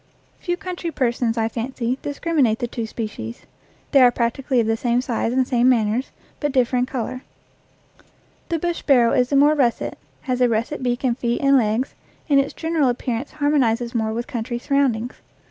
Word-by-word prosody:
Few 350 -1 -2
country 360 -3 -5
persons, 240 -5 0
I 225 -1 +1
fancy, 240 +2 -3
discriminate 285 -6 0
the 240 - -2
two 230 -1 -4
species. 210 - -6 0.5
They 275 - +6
are 250 - +8
practically 245 +2 0
of 230 - +2
the 225 0 +1
same 240 +1 +1
size 240 -2 -1
and 255 0 +1
same 245 0 +3
manners, 230 +1 +1 0.3
but 290 -1 -1
differ 255 -1 +2
in 250 +1 +1
color. 255 -1 -4 1.3
The 335 - 0
bush 345 +1 -2
sparrow 245 -5 +4
is 250 0 +2
more 285 +2 +5
russet, 255 -6 0 0.2
has 255 -2 -2
a 250 - +4
russet 230 +6 -1
beak 245 0 -1
and 245 -3 +2
feet 235 -1 -1
and 275 0 +5
legs, 235 +1 +1 0.4
and 280 -1 +5
its 275 - -1
general 320 -5 +1
appearance 245 +1 -3
harmonizes 255 -6 +1
more 220 -2 0
with 235 +2 -3
country 240 -1 -4
surroundings. 250 -3 0
250 Hz, 180 wpm, -22 LUFS, 235-275 Hz, 1.3 s, are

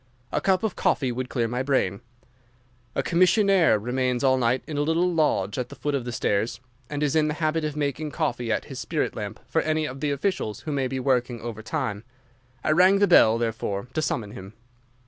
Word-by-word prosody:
A 150 - 0
cup 190 +3 +2
of 220 -4 -1
coffee 130 -3 +1
would 125 +1 -4
clear 120 -3 0
my 125 +2 -2
brain. 130 -7 0 0.9
A - - 0
commissionnaire 185 - +4
remains 125 +3 -1
all 130 -1 +4
night 125 0 +1
in 155 - -6
a 145 - +1
little 165 +4 +1
lodge 130 - +1
at 125 0 -3
the - - -10
foot 145 - -2
of 135 -4 -1
the 120 - -4
stairs, 110 0 -1 0.3
and 145 0 -2
is 145 0 +1
in 155 -1 +3
the 150 - -2
habit 155 0 0
of 150 -1 -2
making 150 +1 -2
coffee 125 -7 -2
at - - -1
his - - -8
spirit - - -2
lamp - - -5
for - - +1
any 155 0 0
of 135 -2 -6
the 150 - -1
officials 140 - -2
who 155 - -5
may 135 -2 0
be 130 +1 -3
working 125 -2 0
over 115 -2 -6
time. 110 -4 -3 0.6
I - - +1
rang 185 +5 +5
the 205 - +4
bell, 110 - +6
therefore, 115 -2 -3
to 155 - 0
summon 110 -8 -2
him. 100 -3 -10
135 Hz, 215 wpm, -25 LUFS, 120-155 Hz, 0.9 s, bell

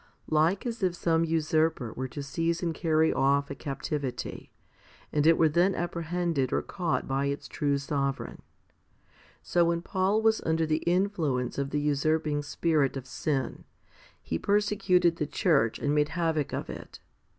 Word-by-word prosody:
Like 160 +7 +2
as 230 -2 -4
if 180 -2 +1
some 165 -1 +1
usurper 155 -6 0
were 130 +1 -4
to 140 +3 -6
seize 165 +4 -1
and 165 -2 0
carry 160 -1 +2
off 140 +1 +2
a - - -2
captivity, 140 -2 -4 0.6
and 150 +1 +3
it 165 - +6
were 160 - +5
then 175 +5 +2
apprehended 170 -5 -1
or - - 0
caught 175 -4 -2
by 135 +1 0
its 140 +1 -3
true 145 -1 0
sovereign, 140 -1 -3 1.0
so 175 -1 +2
when 170 0 0
Paul 195 +4 +1
was 220 0 +3
under 160 0 +1
the 155 0 0
influence 170 -10 0
of 140 0 -1
the 150 - -1
usurping 150 +1 +1
spirit 145 -1 0
of 130 - -7
sin, 135 0 -2 0.6
he 80 - -3
persecuted 195 -4 +2
the 150 - -1
church 140 - +2
and 145 - 0
made 150 0 +2
havoc 160 -4 -1
of - - -3
it. - - -9
155 Hz, 160 wpm, -28 LUFS, 140-170 Hz, 1.0 s, it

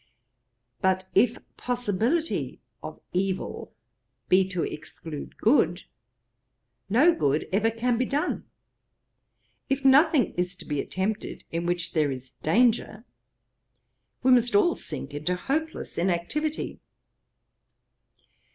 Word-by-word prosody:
But 190 0 +1
if 240 -1 +4 0.2
possibility 245 - -1 0.2
of - - -8
evil 190 +1 -2 0.6
be 190 +1 +4
to 180 -3 -1
exclude 150 0 -7
good, 235 +7 +3 1.1
no 280 - +5
good 145 - 0
ever 220 +3 +3
can 230 +1 0
be 255 - +2
done. 285 +3 -1 1.2
If 270 0 -1
nothing 280 -1 +5
is 180 +1 -2
to - - -12
be 145 -2 -2
attempted 200 +3 -3
in 170 +1 -2
which 175 -1 -1
there 155 -3 +2
is 130 -1 -6
danger, 225 +4 +1 1.2
we 260 - +5
must 245 - +4
all 365 -4 +5
sink 145 -2 -6
into 150 +5 -1
hopeless 310 - -3
inactivity. 190 - -1
210 Hz, 105 wpm, -26 LUFS, 175-260 Hz, 1.2 s, no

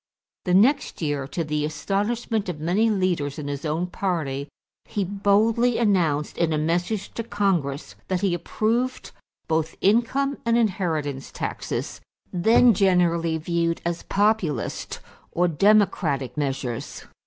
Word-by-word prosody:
The 180 -1 +2
next 255 - +3
year, 145 -3 -1
to 165 +3 -3
the 150 -1 -2
astonishment 205 +7 -1
of 160 -4 -5
many 185 +8 +2
leaders 180 -9 0
in 150 -2 -5
his 145 +1 -4
own 160 +3 0
party, 155 -7 -3 0.4
he 205 - -2
boldly 210 +5 +2
announced 170 -10 +1
in 170 -1 +2
a 155 - +1
message 175 +6 -1
to - - -3
Congress 185 -10 -1
that 185 -1 -1
he 195 -3 +1
approved 225 +8 -1 0.4
both 160 0 -1
income 250 +7 +2
and 235 0 +2
inheritance 160 - -1
taxes, - - -4 0.3
then 225 +6 +5
generally 170 -4 +2
viewed 170 +1 -1
as 170 0 -2
Populist 200 - -1 0.3
or 180 +1 +2
Democratic 170 - +2
measures. 135 -5 -3
180 Hz, 130 wpm, -24 LUFS, 155-210 Hz, 0.4 s, then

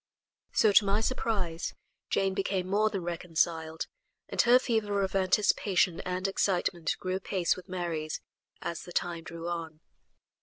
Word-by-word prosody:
So, 215 - +5
to 205 - +7
my 200 +1 +2
surprise, 205 -8 -1 0.3
Jane 195 -1 +1
became 190 -1 -1
more 210 +3 +3
than 195 -4 -3
reconciled, 165 -1 -1 0.4
and - - +3
her 240 +1 +7
fever 210 -5 0
of 190 0 -2
anticipation 190 -2 +3
and 185 +1 -2
excitement 180 -4 0
grew 185 0 -2
apace 190 -2 0
with 185 -1 -12
Mary's 170 -4 -3 0.4
as 170 - -3
the 175 - -10
time 170 -1 -1
drew 170 0 -7
on. 165 -2 -4
185 Hz, 145 wpm, -30 LUFS, 170-200 Hz, 0.4 s, to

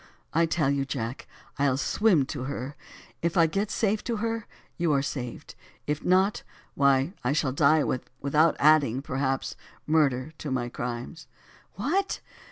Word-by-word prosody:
I 165 +1 +3
tell 155 -4 +1
you 140 -1 +1
Jack, 130 -2 -4 0.3
I'll 135 -2 +2
swim 180 -1 +3
to 130 -1 -5
her, 140 +1 -5 0.5
if 170 +1 0
I 165 - +7
get 195 +6 -1
safe 215 -1 0
to 235 - -1
her, 225 0 -2 0.3
you 170 -3 +1
are 135 -1 +2
saved, 125 -4 -5 0.3
if 150 +1 -2
not, 190 +3 +3 0.3
why 140 +3 +3
I 125 +3 +1
shall 145 -3 +1
die 145 +3 +4
without 140 +5 +1
adding, 140 -4 +4
perhaps, 135 -1 -1 0.3
murder 150 -2 +2
to 150 - -5
my 125 -2 -1
crimes." 120 +7 -6 0.5
"What! 345 - 0
145 Hz, 150 wpm, -27 LUFS, 130-170 Hz, 0.5 s, I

